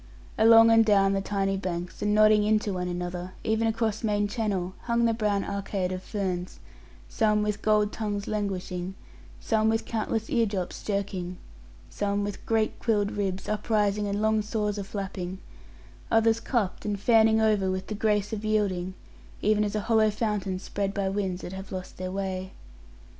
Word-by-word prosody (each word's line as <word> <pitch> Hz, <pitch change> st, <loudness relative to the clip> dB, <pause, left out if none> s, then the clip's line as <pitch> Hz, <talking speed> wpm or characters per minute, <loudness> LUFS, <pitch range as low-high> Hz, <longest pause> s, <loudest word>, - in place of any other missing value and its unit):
Along 225 Hz, +1 st, +7 dB
and 225 Hz, 0 st, +7 dB
down 195 Hz, -2 st, +4 dB
the 195 Hz, -, 0 dB
tiny 195 Hz, -1 st, -1 dB
banks, 180 Hz, -2 st, -4 dB
and 210 Hz, -, +1 dB
nodding 215 Hz, 0 st, +6 dB
into 210 Hz, -1 st, +1 dB
one 180 Hz, -1 st, -2 dB
another, 180 Hz, +1 st, -4 dB
even 220 Hz, +1 st, +1 dB
across 225 Hz, -1 st, -1 dB
main 205 Hz, -1 st, +1 dB
channel, 200 Hz, -5 st, -2 dB
hung 235 Hz, 0 st, +2 dB
the 230 Hz, -, +3 dB
brown 210 Hz, -3 st, 0 dB
arcade 195 Hz, -2 st, -2 dB
of 185 Hz, 0 st, -4 dB
ferns; 185 Hz, -3 st, -3 dB, 0.5 s
some 210 Hz, -1 st, +2 dB
with 210 Hz, -1 st, -2 dB
gold 210 Hz, -1 st, +3 dB
tongues 205 Hz, -2 st, -3 dB
languishing; 190 Hz, -3 st, -3 dB, 0.4 s
some 220 Hz, -1 st, +1 dB
with 225 Hz, 0 st, 0 dB
countless 225 Hz, 0 st, -2 dB
ear 230 Hz, -2 st, +2 dB
drops 190 Hz, -3 st, -4 dB
jerking, 190 Hz, -3 st, -3 dB, 0.5 s
some 205 Hz, 0 st, -1 dB
with 205 Hz, -1 st, -5 dB
great 220 Hz, -1 st, +1 dB
quilled 210 Hz, -3 st, +1 dB
ribs 195 Hz, -2 st, -3 dB
uprising 210 Hz, -1 st, 0 dB
and 205 Hz, +1 st, -1 dB
long 220 Hz, 0 st, +3 dB
saws 210 Hz, -1 st, -2 dB
aflapping; 190 Hz, -2 st, -5 dB, 0.7 s
others 225 Hz, 0 st, +3 dB
cupped, 230 Hz, -6 st, -1 dB
and 205 Hz, -1 st, -2 dB
fanning 220 Hz, 0 st, +4 dB
over 210 Hz, -3 st, +2 dB
with 185 Hz, 0 st, -2 dB
the -, -, -5 dB
grace 210 Hz, -1 st, 0 dB
of 215 Hz, -1 st, -4 dB
yielding, 190 Hz, -4 st, 0 dB, 0.5 s
even 210 Hz, 0 st, +3 dB
as 205 Hz, 0 st, -2 dB
a 210 Hz, -, 0 dB
hollow 220 Hz, 0 st, +3 dB
fountain 210 Hz, -3 st, -1 dB
spread 200 Hz, +1 st, -3 dB
by 200 Hz, -2 st, 0 dB
winds 190 Hz, -2 st, -2 dB
that 180 Hz, -, -6 dB
have 190 Hz, 0 st, -8 dB
lost 185 Hz, -1 st, -6 dB
their 185 Hz, 0 st, -4 dB
way. 190 Hz, -1 st, -4 dB
205 Hz, 170 wpm, -27 LUFS, 190-215 Hz, 0.7 s, Along